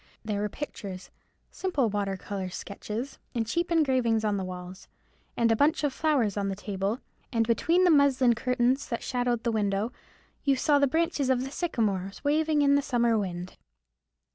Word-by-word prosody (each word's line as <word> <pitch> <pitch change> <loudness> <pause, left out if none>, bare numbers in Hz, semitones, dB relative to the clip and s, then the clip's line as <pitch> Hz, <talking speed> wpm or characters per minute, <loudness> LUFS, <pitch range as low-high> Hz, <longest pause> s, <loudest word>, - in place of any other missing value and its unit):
There 205 -2 -1
were 210 - -1
pictures,—simple 230 - -5
water 200 -2 -1
colour 190 -1 -5
sketches,—and 225 +5 -5
cheap 340 +10 -1
engravings 255 -8 +2
on 210 -1 +1
the 190 - -2
walls, 185 +1 -8 0.5
and 230 -1 +3
a - - +4
bunch 300 +6 +2
of 290 -3 +1
flowers 270 -11 +1
on 200 -1 0
the 195 - -2
table, 200 +3 -3 0.3
and 230 -3 +2
between 330 - +2
the 360 - +5
muslin 275 -4 +5
curtains 250 +4 0
that 235 - -3
shadowed 245 -2 -1
the 235 - +1
window 205 +1 0 0.5
you 275 -2 +3
saw 285 +2 +3
the 280 - +4
branches 320 -2 0
of 255 -1 +2
the 270 - -6
sycamores 210 - -2
waving 300 0 +2
in 280 0 +4
the 285 - +4
summer 235 -4 +2
wind. 185 -3 -4
235 Hz, 165 wpm, -28 LUFS, 205-280 Hz, 0.5 s, the